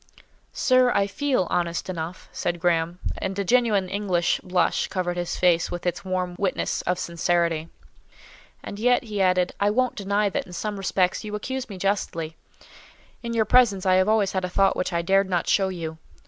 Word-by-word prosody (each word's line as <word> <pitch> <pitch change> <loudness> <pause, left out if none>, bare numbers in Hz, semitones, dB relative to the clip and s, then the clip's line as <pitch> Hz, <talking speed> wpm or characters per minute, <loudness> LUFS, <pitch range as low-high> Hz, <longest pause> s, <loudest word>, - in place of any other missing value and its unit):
"Sir, 255 -1 +3
I 200 - +3
feel 255 0 0
honest 170 -1 -1
enough," 175 -1 -6
said 175 0 -2
Graham; 170 0 +1 0.2
and 190 0 -3
a 200 - 0
genuine 215 -3 +2
English 185 -3 0
blush 180 -2 +1
covered 180 -2 -2
his 175 -1 -3
face 170 -2 +3
with 175 0 -6
its 175 0 -2
warm 185 -1 -2
witness 195 -2 -1
of 180 0 +1
sincerity. 170 -2 0 0.9
"And 200 - -7
yet," 245 +2 +3
he 210 -4 -3
added, 180 -1 +2
"I 205 - +3
won't 255 +4 +1
deny 205 0 0
that - - -3
in 180 - -11
some 210 +3 -3
respects 185 -1 0
you 210 -1 -5
accuse 260 +4 -4
me 195 - -7
justly. 175 -4 -2 0.9
In 235 -1 -4
your 220 -1 +2
presence 210 -5 +4
I 185 - +4
have 185 +2 +3
always 215 -3 +2
had 190 -1 -2
a 180 - -2
thought 195 +2 +2
which 180 - -2
I 170 -1 -1
dared 195 +2 +2
not 175 -2 0
show 195 -1 +3
you. 160 -3 -6
185 Hz, 190 wpm, -24 LUFS, 175-205 Hz, 0.9 s, presence